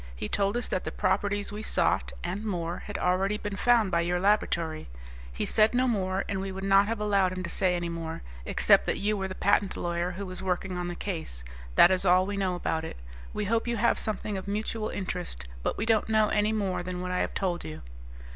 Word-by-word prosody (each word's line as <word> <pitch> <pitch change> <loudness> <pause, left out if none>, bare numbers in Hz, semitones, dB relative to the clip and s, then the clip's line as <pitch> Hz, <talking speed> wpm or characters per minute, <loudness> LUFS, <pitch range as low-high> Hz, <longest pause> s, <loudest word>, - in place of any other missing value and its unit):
He - - -4
told 200 - 0
us 240 - -1
that 185 - -1
the - - -4
properties 205 +1 0
we 210 +1 -5
sought - - +1
and 185 +5 -3
more 175 -5 -2
had 205 - -4
already 190 +3 +1
been 205 -1 -4
found 225 -1 +3
by 170 - +3
your 175 +1 0
laboratory. 170 - +1 0.4
He - - -3
said 220 +2 +3
no 255 +1 +3
more, 190 -4 0
and 195 -1 -2
we 195 0 -4
would 190 +1 -6
not 195 +1 +5
have 225 0 -2
allowed 200 -3 +2
him 185 0 -4
to 170 - -5
say 185 -3 +2
any 175 0 -2
more, 165 - -5 0.2
except - - +4
that - - +1
you 210 +1 0
were 195 -1 -2
the 185 - -6
patent 200 0 +2
lawyer 175 0 -1
who 190 +3 -5
was 185 -1 -5
working 185 0 -1
on 180 0 -2
the 175 - -4
case. 160 - -5 0.3
That 175 - +8
is 185 0 +1
all 185 0 +5
we 205 +1 -3
know 190 -2 0
about 160 -2 -1
it. 160 - -6 0.3
We 210 - -2
hope 230 +3 +1
you 235 -1 0
have 235 +2 +3
something 210 -1 -2
of 190 - -6
mutual 215 +2 -2
interest, 180 - -4
but - - -1
we 210 - -1
don't 225 -1 +2
know 215 -1 +4
any 210 +1 +2
more 200 -5 -1
than 180 0 -4
what 180 0 -3
I 180 - 0
have - - -2
told 180 -3 -1
you." 80 0 -7
190 Hz, 235 wpm, -28 LUFS, 180-210 Hz, 0.4 s, That